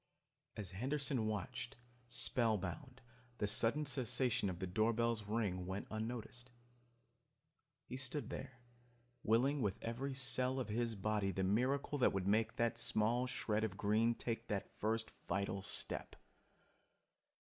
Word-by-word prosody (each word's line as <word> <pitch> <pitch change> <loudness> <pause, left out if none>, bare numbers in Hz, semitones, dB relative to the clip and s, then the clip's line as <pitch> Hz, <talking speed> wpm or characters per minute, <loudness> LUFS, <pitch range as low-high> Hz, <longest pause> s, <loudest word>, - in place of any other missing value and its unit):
As 100 -4 -4
Henderson 130 +2 0
watched, 115 +3 -3 0.3
spellbound, 120 - +1 0.4
the 105 - +1
sudden 115 +8 +3
cessation 125 -5 +1
of 90 - -4
the 95 - -2
doorbell's 110 +4 +2
ring 100 -4 -1
went 95 +2 -3
unnoticed. 120 +2 -4 1.4
He 130 - -5
stood 135 +2 -3
there, 130 - -6 0.6
willing 130 +6 +3
with 100 -4 0
every 130 +4 -3
cell 130 0 +1
of 125 - -3
his 115 +1 0
body 105 0 0
the 95 0 -1
miracle 130 +9 +1
that 125 - +4
would 95 -1 0
make 110 +3 +2
that 115 0 +1
small 120 +1 +2
shred 110 -3 0
of 100 -3 -2
green 110 +3 +3
take 115 0 -3
the 100 -3 0 0.2
first 110 +1 0 0.2
vital 100 +2 0
step. 100 +2 -3
115 Hz, 130 wpm, -38 LUFS, 105-125 Hz, 1.4 s, that